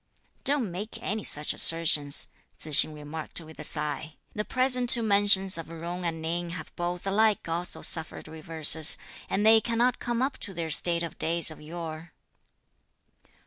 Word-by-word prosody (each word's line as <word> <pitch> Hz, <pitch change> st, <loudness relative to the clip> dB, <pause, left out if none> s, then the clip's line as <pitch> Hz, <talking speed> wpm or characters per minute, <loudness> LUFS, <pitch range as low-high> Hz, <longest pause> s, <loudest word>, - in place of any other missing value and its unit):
"Don't 270 Hz, -8 st, +1 dB
make 205 Hz, +6 st, -7 dB
any 215 Hz, +1 st, -3 dB
such 150 Hz, +1 st, +2 dB
assertions," 155 Hz, -3 st, +4 dB, 0.3 s
Tzu 155 Hz, -, -11 dB
hsing 155 Hz, +1 st, +7 dB
remarked 150 Hz, +3 st, -6 dB
with 160 Hz, -1 st, -14 dB
a -, -, -7 dB
sigh, 150 Hz, +1 st, -5 dB, 0.2 s
"the 210 Hz, -, -3 dB
present 255 Hz, 0 st, +1 dB
two 235 Hz, -2 st, +8 dB
mansions 200 Hz, -3 st, +4 dB
of 165 Hz, -, -8 dB
Jung 170 Hz, +2 st, -7 dB
and 165 Hz, -1 st, -3 dB
Ning 170 Hz, +2 st, -4 dB
have 170 Hz, -2 st, -9 dB
both 175 Hz, +1 st, -5 dB
alike 210 Hz, +1 st, +1 dB
also 170 Hz, +2 st, -5 dB
suffered 160 Hz, -1 st, -4 dB
reverses, 160 Hz, 0 st, 0 dB, 0.3 s
and 205 Hz, +2 st, -1 dB
they 220 Hz, 0 st, +6 dB
cannot 240 Hz, +2 st, -1 dB
come 240 Hz, 0 st, -2 dB
up 270 Hz, +1 st, -3 dB
to 195 Hz, -4 st, -8 dB
their 165 Hz, -1 st, -4 dB
state 170 Hz, +2 st, +2 dB
of 170 Hz, -, -8 dB
days 170 Hz, 0 st, 0 dB
of 155 Hz, -, -13 dB
yore." 160 Hz, 0 st, -9 dB
170 Hz, 165 wpm, -26 LUFS, 160-210 Hz, 0.3 s, two